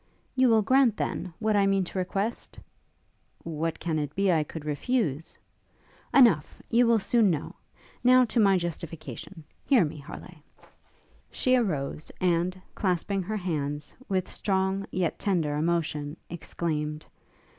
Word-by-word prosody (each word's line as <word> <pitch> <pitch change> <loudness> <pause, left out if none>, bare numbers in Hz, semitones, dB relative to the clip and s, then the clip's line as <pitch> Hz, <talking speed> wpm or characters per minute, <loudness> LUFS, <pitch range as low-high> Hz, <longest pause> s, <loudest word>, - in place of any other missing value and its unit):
'You 260 -1 +4
will 220 -2 +4
grant, 260 -1 +4
then, 180 - -3
what 220 -1 +1
I 200 -1 +4
mean 195 -1 +2
to 185 +1 -4
request?' 195 +5 -3 0.8
'What 165 0 -3
can 160 -2 -1
it 145 -1 -4
be 195 -1 +3
I 160 -3 +3
could 150 0 -8
refuse?' 155 - -1 0.7
'Enough! 220 - +4
You 240 +1 +5
will 230 -1 +5
soon 220 +1 +3
know. 155 -5 -2 0.5
Now 255 0 +6
to 235 +1 -1
my 195 -3 +5
justification. 170 0 -6 0.2
Hear 250 - +4
me, 150 0 -6
Harleigh!' 155 +3 -11 0.9
She 255 0 +2
arose, 155 - -1
and, 180 +1 +1
clasping 190 +1 0
her 215 +4 -3
hands, 145 -5 -3 0.2
with 185 -2 0
strong, 190 0 -1
yet 180 -3 -1
tender, 170 -8 0
emotion, 155 -1 -1
exclaimed. 155 -2 -3
180 Hz, 135 wpm, -27 LUFS, 155-210 Hz, 0.9 s, Now